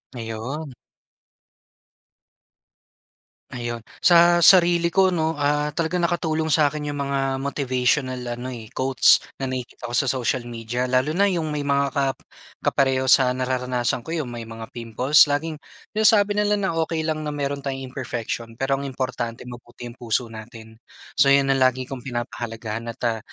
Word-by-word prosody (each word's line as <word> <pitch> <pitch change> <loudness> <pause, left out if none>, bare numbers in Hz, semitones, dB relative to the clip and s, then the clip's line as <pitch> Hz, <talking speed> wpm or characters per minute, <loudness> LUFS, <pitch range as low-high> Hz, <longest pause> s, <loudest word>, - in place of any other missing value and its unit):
Ayun. 120 +6 -5 2.8
Ayun 120 -2 -5 0.2
sa 175 0 +6
sarili 175 -2 +6
ko 190 -1 +4
'no, 160 -2 0
ah, 145 +1 0
talagang 170 +2 -1
nakatulong 160 -2 -1
sa 150 -2 +4
akin 150 -1 -5
yung 145 - -4
mga 135 -1 -1
motivational 130 -1 0 0.2
ano 125 - -6
eh, 110 -2 -9
quotes 130 0 +4 0.2
na 135 - -2
nakikita 125 -1 -6
ko - - -2
sa 135 - +2
social 125 -1 -1
media. 120 +1 -3
Lalo 130 +4 +1
na 195 +5 +2
yung 165 -5 -1
may 145 -1 -3
mga 140 0 +1
kap 135 -1 0 0.5
kapareho 130 -1 +1
sa 130 -2 +6
nararanasan 125 -1 -1
ko- 165 - -4
yung 150 -6 -3
may 115 -1 -6
mga 115 0 -9
pimples. 125 +6 +3
Laging 155 +2 -2 0.3
sinasabi 210 -1 +4
nila 210 0 +2
na, 195 -2 -1
"Okey 160 0 -1
lang 155 -1 -2
na - - -2
meron 140 0 -2
tayong 135 -1 -5
imperfection, 120 -3 -5
pero 135 +2 0
ang 140 - -4
importante 125 -3 -4
mabuti 120 0 -11
ang 120 - -14
puso 115 0 -1
natin." 110 0 -11 0.4
So, 140 - +6
yun 140 0 +4
ang 135 - +2
lagi 130 0 +2
kong 130 -1 -8
pinapahalagahan, 115 -2 -5
at 115 - -7
ah, 115 -2 0
135 Hz, 160 wpm, -23 LUFS, 120-150 Hz, 2.8 s, sa